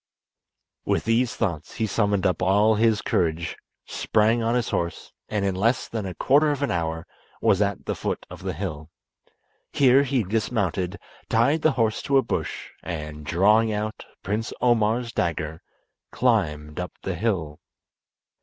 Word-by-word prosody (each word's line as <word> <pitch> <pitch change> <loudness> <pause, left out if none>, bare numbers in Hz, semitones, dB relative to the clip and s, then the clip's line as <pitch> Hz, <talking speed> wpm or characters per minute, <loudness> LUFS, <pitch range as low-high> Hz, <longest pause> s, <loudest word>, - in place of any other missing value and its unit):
With - - 0
these 115 +1 +1
thoughts 85 -8 -3
he 110 - 0
summoned 100 -2 +1
up 90 - +1
all 105 +4 +4
his 110 0 +2
courage 85 -1 0 0.3
sprang 110 +2 +1
on 115 +1 +1
his 120 -3 0
horse, 85 0 -3 0.2
and 105 -2 -1
in 95 - +1
less 115 +7 +1
than 110 -4 -4
a 90 - -6
quarter 145 +3 +4
of 145 -1 -1
an 140 - 0
hour 80 -1 -2 0.3
was 95 - +3
at 100 -2 -1
the - - -1
foot - - -3
of - - -11
the - - -3
hill. 80 -3 -5 0.8
Here 135 0 +5
he 135 -3 +1
dismounted, 100 -3 -1 0.3
tied 140 +8 +3
the 155 -2 +3
horse 115 -3 0
to 140 -1 +2
a 135 - +4
bush, - - -4
and, 75 -3 -6
drawing 105 +8 +3
out 105 +1 -4 0.2
Prince 105 +4 -2
Omar's 120 0 +2
dagger 80 -2 -2 0.5
climbed 75 -12 0
up 90 - -4
the 95 - -2
hill. 85 -6 -2
105 Hz, 155 wpm, -24 LUFS, 85-115 Hz, 0.8 s, Here